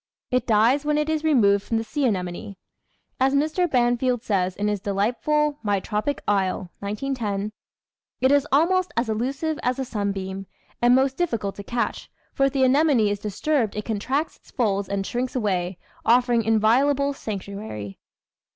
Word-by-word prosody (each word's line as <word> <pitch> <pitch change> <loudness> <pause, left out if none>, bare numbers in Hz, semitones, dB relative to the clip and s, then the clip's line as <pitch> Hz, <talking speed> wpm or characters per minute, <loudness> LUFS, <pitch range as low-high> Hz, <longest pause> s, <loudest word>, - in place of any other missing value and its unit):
It 255 0 +1
dies 235 +6 +4
when 300 0 +1
it 300 +1 0
is 315 -1 0
removed 205 -10 +4
from 225 - -1
the 225 - -1
sea 280 +5 -2
anemone. 185 -1 -3 0.6
As 265 +1 +3
Mr. 315 +5 +1
Banfield 245 -1 +1
says 185 -5 0
in 205 +1 -1
his 210 -1 0
delightful 250 +10 0
My 205 -3 +1
Tropic 215 +8 -2
Isle 190 -3 0
(1910), 210 -1 -3 0.7
"it 260 +1 +3
is 285 0 +3
almost 365 +6 +3
as 235 0 +1
elusive 275 +8 -2
as 250 0 0
a 265 - -2
sunbeam, 195 -4 -3 0.3
and 240 +1 +5
most 265 +1 +2
dif 350 -1 +1
ficult 205 -4 -2
to 200 - -9
catch, 235 +4 -3 0.2
for 275 - +3
if - - -2
the 270 -2 +2
anemone 260 -5 +4
is 205 - -2
disturbed 220 +4 -1
it 210 - -4
contracts 260 +8 -2
its - - -24
folds 200 -5 0
and 200 -1 -2
shrinks 250 +4 -3
away, 185 -6 -1 0.3
offering 240 0 +3
inviolable 255 +6 +3
sanctuary." 200 - -6
235 Hz, 165 wpm, -24 LUFS, 200-275 Hz, 0.7 s, and